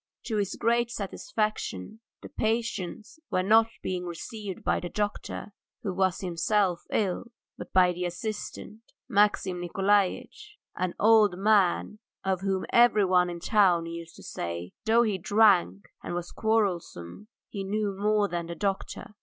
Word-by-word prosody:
To 220 Hz, -, -2 dB
his 200 Hz, -2 st, -1 dB
great 235 Hz, +1 st, +1 dB
satisfaction 215 Hz, -, -3 dB, 0.2 s
the -, -, -8 dB
patients 220 Hz, -, -3 dB
were 185 Hz, -3 st, +1 dB
not 220 Hz, +3 st, +5 dB
being 180 Hz, -1 st, -3 dB
received 190 Hz, +3 st, -7 dB
by -, -, +1 dB
the 175 Hz, -, -5 dB
doctor, 205 Hz, +1 st, -4 dB, 0.3 s
who 195 Hz, -, -2 dB
was 185 Hz, -1 st, 0 dB
himself 185 Hz, 0 st, 0 dB
ill, 195 Hz, +1 st, 0 dB, 0.3 s
but -, -, -9 dB
by 180 Hz, -1 st, +5 dB
the 180 Hz, +1 st, -3 dB
assistant, 215 Hz, +4 st, -6 dB, 0.3 s
Maxim 205 Hz, -5 st, +2 dB
Nikolaitch, 200 Hz, -, 0 dB, 0.2 s
an 185 Hz, -1 st, -2 dB
old 215 Hz, -4 st, +5 dB
man 205 Hz, 0 st, +2 dB, 0.2 s
of 190 Hz, -1 st, 0 dB
whom 195 Hz, -1 st, -1 dB
everyone 195 Hz, -7 st, +5 dB
in 175 Hz, -, -5 dB
the 170 Hz, -, -10 dB
town 185 Hz, -6 st, +4 dB
used 165 Hz, 0 st, -8 dB
to -, -, -13 dB
say 85 Hz, +1 st, -5 dB
that, 220 Hz, -, 0 dB
though 235 Hz, +1 st, +6 dB
he 210 Hz, -4 st, -1 dB
drank 185 Hz, -, +3 dB
and 175 Hz, -, -5 dB
was 175 Hz, 0 st, -5 dB
quarrelsome, 205 Hz, -, -1 dB, 0.2 s
he 200 Hz, -2 st, -5 dB
knew 205 Hz, 0 st, -2 dB
more 210 Hz, +1 st, +2 dB
than 170 Hz, -3 st, -4 dB
the 170 Hz, -, -6 dB
doctor. 195 Hz, +2 st, -3 dB
195 Hz, 150 wpm, -27 LUFS, 180-215 Hz, 0.3 s, though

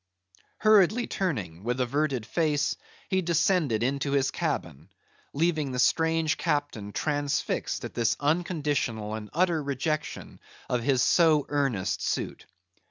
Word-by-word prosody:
Hurriedly 215 Hz, +2 st, +4 dB
turning, 100 Hz, -, -3 dB
with 120 Hz, +3 st, -1 dB
averted 130 Hz, -1 st, 0 dB
face, 150 Hz, +3 st, 0 dB, 0.3 s
he 190 Hz, 0 st, +1 dB
descended 165 Hz, -, +1 dB
into 140 Hz, +2 st, -1 dB
his 135 Hz, -1 st, +2 dB
cabin, 85 Hz, -, -3 dB, 0.4 s
leaving 155 Hz, -2 st, 0 dB
the -, -, -3 dB
strange 160 Hz, +4 st, +2 dB
captain 145 Hz, -, -2 dB
transfixed 145 Hz, +5 st, -1 dB
at -, -, -7 dB
this 115 Hz, -2 st, +1 dB
unconditional 145 Hz, -, -1 dB
and 110 Hz, -1 st, -6 dB
utter 170 Hz, -1 st, +1 dB
rejection 145 Hz, +2 st, -3 dB, 0.3 s
of 125 Hz, -1 st, 0 dB
his 130 Hz, 0 st, +2 dB
so 160 Hz, -4 st, +4 dB
earnest 135 Hz, -10 st, 0 dB
suit. -, -, -3 dB
145 Hz, 120 wpm, -27 LUFS, 120-160 Hz, 0.4 s, Hurriedly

